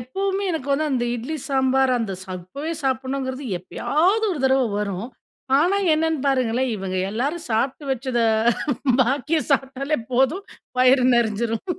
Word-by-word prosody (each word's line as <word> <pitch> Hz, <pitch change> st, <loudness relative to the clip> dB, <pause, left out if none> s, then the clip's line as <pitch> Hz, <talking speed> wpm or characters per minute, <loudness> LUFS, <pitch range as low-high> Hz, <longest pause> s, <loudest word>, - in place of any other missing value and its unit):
எப்பவுமே 390 Hz, +10 st, -2 dB
எனக்கு 285 Hz, -4 st, -4 dB
வந்து 305 Hz, +2 st, +1 dB
அந்த 240 Hz, -2 st, 0 dB
இட்லி 260 Hz, +7 st, -4 dB
சாம்பார் 265 Hz, -1 st, +2 dB
அந்த 205 Hz, -5 st, -3 dB
சப்பவே 185 Hz, -, -6 dB
சாப்பிடணுங்கிறது, 260 Hz, 0 st, -2 dB
எப்பயாவது 360 Hz, -, +1 dB
ஒரு 295 Hz, -, -4 dB
தடவ 265 Hz, -1 st, +4 dB, 0.2 s
வரும். 200 Hz, +3 st, -3 dB, 0.5 s
ஆனா, 365 Hz, +5 st, +2 dB, 0.2 s
என்னன்னு 320 Hz, -2 st, 0 dB
பாருங்களேன் 255 Hz, -1 st, +1 dB
இவங்க 190 Hz, -1 st, -4 dB
எல்லாரும் 285 Hz, +10 st, -2 dB
சாப்பிட்டு 260 Hz, +6 st, 0 dB
வச்சது 245 Hz, -2 st, -1 dB, 0.8 s
பாக்கிய 280 Hz, +6 st, 0 dB
சாப்பிட்டாலே 275 Hz, +2 st, 0 dB
போதும் 270 Hz, +11 st, +2 dB, 0.3 s
வயிறு 255 Hz, 0 st, +5 dB
நெறிஞ்சிரும். 225 Hz, 0 st, 0 dB
265 Hz, 125 wpm, -22 LUFS, 235-300 Hz, 0.8 s, வயிறு